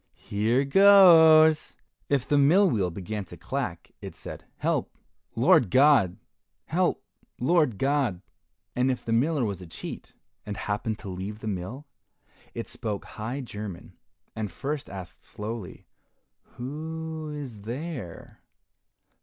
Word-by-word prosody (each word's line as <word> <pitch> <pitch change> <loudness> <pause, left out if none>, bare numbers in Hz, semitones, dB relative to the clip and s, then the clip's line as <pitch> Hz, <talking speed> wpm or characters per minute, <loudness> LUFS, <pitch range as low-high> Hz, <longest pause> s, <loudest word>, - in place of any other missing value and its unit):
here 115 +6 0
goes." 160 -3 +7 0.3
If 140 -3 +1
the 145 - +3
mill 175 +9 +5
wheel 95 -6 +1
began 100 +4 -5
to - - -12
clack, - - -4
it - - -8
said, - - -9
"Help, - - -1 0.4
Lord 115 - +4
God! 130 -8 +4 0.5
help, - - 0 0.3
Lord 145 - +2
God!" 135 -8 0 0.5
And 125 +1 +2
if 125 - -2
the 115 - -1
miller 140 +3 +2
was 100 -4 -4
a 90 - -10
cheat 80 - -8 0.3
and 105 -2 -6
happened 105 +1 -2
to - - -5
leave 95 +3 -5
the 110 - -8
mill, 105 +9 -5 0.7
it - - -5
spoke 105 -3 -5
high 120 +6 -5
German, 105 -7 -8 0.4
and 105 -3 -4
first 145 - -4
asked 95 -2 -9
slowly, 105 -2 -7 0.7
"Who 160 +4 -5
is 140 -8 -7
there? 125 - -7
125 Hz, 130 wpm, -26 LUFS, 105-150 Hz, 0.7 s, goes